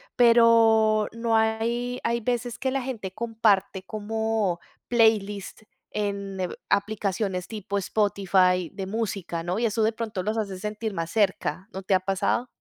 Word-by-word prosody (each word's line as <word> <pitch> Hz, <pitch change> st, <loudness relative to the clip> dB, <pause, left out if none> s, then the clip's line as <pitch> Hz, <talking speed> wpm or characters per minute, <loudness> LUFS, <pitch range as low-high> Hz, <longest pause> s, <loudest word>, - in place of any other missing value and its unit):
pero, 225 Hz, -2 st, +5 dB
no, 230 Hz, 0 st, 0 dB
hay 230 Hz, +3 st, 0 dB
hay 235 Hz, 0 st, 0 dB
veces 240 Hz, 0 st, -2 dB
que 260 Hz, 0 st, -1 dB
la 270 Hz, 0 st, -1 dB
gente 230 Hz, -7 st, -5 dB
comparte, 210 Hz, -4 st, +1 dB
como 215 Hz, -2 st, -1 dB, 0.3 s
playlist, 215 Hz, -4 st, +1 dB, 0.3 s
en, 200 Hz, -2 st, -3 dB
eh, 180 Hz, -1 st, -1 dB, 0.2 s
aplicaciones 200 Hz, -2 st, -1 dB
tipo 205 Hz, -2 st, -4 dB
Spotify, 190 Hz, -3 st, +2 dB
de 195 Hz, -1 st, -5 dB
música, 195 Hz, -5 st, -3 dB
¿no? 180 Hz, +4 st, -2 dB
Y 235 Hz, -, +1 dB
eso, 220 Hz, 0 st, +1 dB
de 220 Hz, +1 st, +2 dB
pronto 215 Hz, -4 st, -4 dB
los 215 Hz, +3 st, -1 dB
hace 200 Hz, -4 st, -3 dB
sentir, 210 Hz, +2 st, -4 dB
más 165 Hz, -2 st, -3 dB
cerca, 195 Hz, -2 st, 0 dB
¿no 190 Hz, -, -6 dB
te 190 Hz, -, 0 dB
ha -, -, +4 dB
pasado? 195 Hz, +6 st, 0 dB
215 Hz, 150 wpm, -26 LUFS, 195-225 Hz, 0.3 s, pero